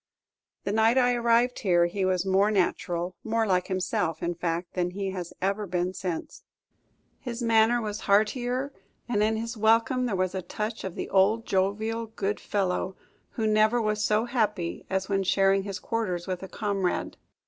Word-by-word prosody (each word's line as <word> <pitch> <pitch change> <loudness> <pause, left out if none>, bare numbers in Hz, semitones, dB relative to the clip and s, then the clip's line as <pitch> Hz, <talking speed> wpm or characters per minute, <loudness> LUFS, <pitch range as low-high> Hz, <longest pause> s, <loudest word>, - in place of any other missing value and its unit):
The 200 - -2
night 225 +3 +3
I 250 -1 +4
arrived 235 +1 +2
here 175 -3 +3
he 185 +2 -1
was 185 0 +1
more 195 +2 +3
natural, 180 -2 -1
more 225 0 +1
like 180 -3 +1
himself, 180 -3 -1
in 175 - 0
fact, 170 +1 -3
than 180 -1 0
he 195 +1 -3
has 180 -3 -5
ever 200 +2 0
been 180 +1 -1
since. 180 -4 -5 0.8
His 245 -2 -5
manner 230 +1 +4
was 210 -2 -4
heartier, 245 +6 +1 0.3
and 220 -4 0
in 220 +1 +2
his 230 +2 -4
welcome 230 +4 +3
there 210 - -1
was 185 -1 0
a 190 - -2
touch 215 +5 -4
of 190 -2 -5
the - - -4
old 210 +4 +3
jovial 220 +3 0
good 210 -2 -3
fellow, 190 -1 -1 0.4
who 225 - -2
never 215 +2 +3
was 215 -1 0
so 215 +2 +2
happy 210 -8 -1
as 190 0 -1
when 195 -1 +1
sharing 195 +1 +3
his 195 -1 -5
quarters 185 -7 -2
with 185 -2 -4
a 190 - -6
comrade. 195 -3 -2
205 Hz, 175 wpm, -27 LUFS, 185-225 Hz, 0.8 s, I